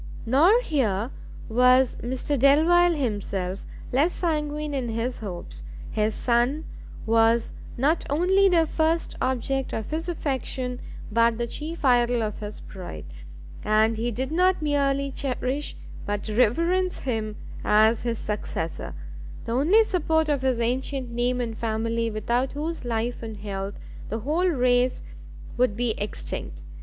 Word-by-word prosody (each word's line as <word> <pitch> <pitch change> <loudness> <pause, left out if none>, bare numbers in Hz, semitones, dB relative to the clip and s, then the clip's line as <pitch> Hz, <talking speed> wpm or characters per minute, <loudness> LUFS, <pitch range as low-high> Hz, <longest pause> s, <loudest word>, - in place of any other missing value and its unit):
Nor 330 - +5
here 235 - 0 0.4
was 250 +2 +4
Mr 260 +4 -2
Delvile 330 +6 +5
himself 200 -7 -2 0.3
less 295 +8 +2
sanguine 300 -3 -2
in 260 -4 -2
his 230 +3 -2
hopes; 185 -5 -6 0.3
his 215 0 0
son 245 +6 +1 0.4
was 225 +1 +3 0.2
not 295 +7 +2
only 375 +6 +4
the 335 -3 +4
first 320 +1 0
object 260 +1 -1
of 220 - -4
his 325 +3 -2
affection, 260 -5 -3 0.3
but 230 +1 +3
the 235 - -1
chief 305 +6 -5
idol 240 -2 +3
of 210 -1 -3
his 210 0 -7
pride, 175 - -8 0.6
and 215 +1 +3
he 230 +2 -1
did 260 +4 -3
not 365 +3 +3
merely 280 -2 +1
cherish 270 +1 -2 0.3
but 205 +1 -2
reverence 335 - +2
him 220 -4 -2 0.3
as 220 +2 +4
his 235 -1 -2
successor, 210 -6 -4 0.5
the 230 - -4
only 320 - +5
support 320 -6 +1
of 285 -3 +1
his 260 -3 +1
ancient 255 +2 -1
name 245 +1 0
and 230 -2 -3
family, 230 +1 -1
without 235 +4 -1
whose 310 0 -4
life 235 +1 -2
and 220 -2 -6
health 200 -1 -5 0.3
the 225 +1 -3
whole 315 - +1
race 250 -5 +2 0.5
would 240 -4 +2
be 240 -1 +1
extinct. 205 - -5
250 Hz, 135 wpm, -25 LUFS, 225-295 Hz, 0.6 s, Nor